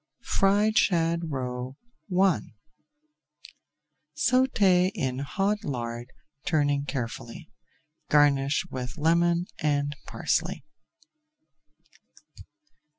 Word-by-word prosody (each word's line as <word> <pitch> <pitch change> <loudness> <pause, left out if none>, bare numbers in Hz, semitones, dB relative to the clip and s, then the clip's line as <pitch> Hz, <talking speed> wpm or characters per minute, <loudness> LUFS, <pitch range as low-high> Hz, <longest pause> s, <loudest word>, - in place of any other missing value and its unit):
FRIED 205 +3 +4
SHAD 170 -2 +2
ROE 130 -1 -4 0.5
I 190 -4 +3 1.8
Sauté 200 -8 +3
in 130 - -2
hot 195 +8 -1
lard, 120 -2 -4 0.3
turning 145 -3 +1
carefully. 125 +2 -6 0.6
Garnish 145 0 +3
with 125 -1 -5
lemon 170 +2 +2
and 145 -1 0
parsley. - - -1
150 Hz, 70 wpm, -27 LUFS, 135-180 Hz, 1.8 s, FRIED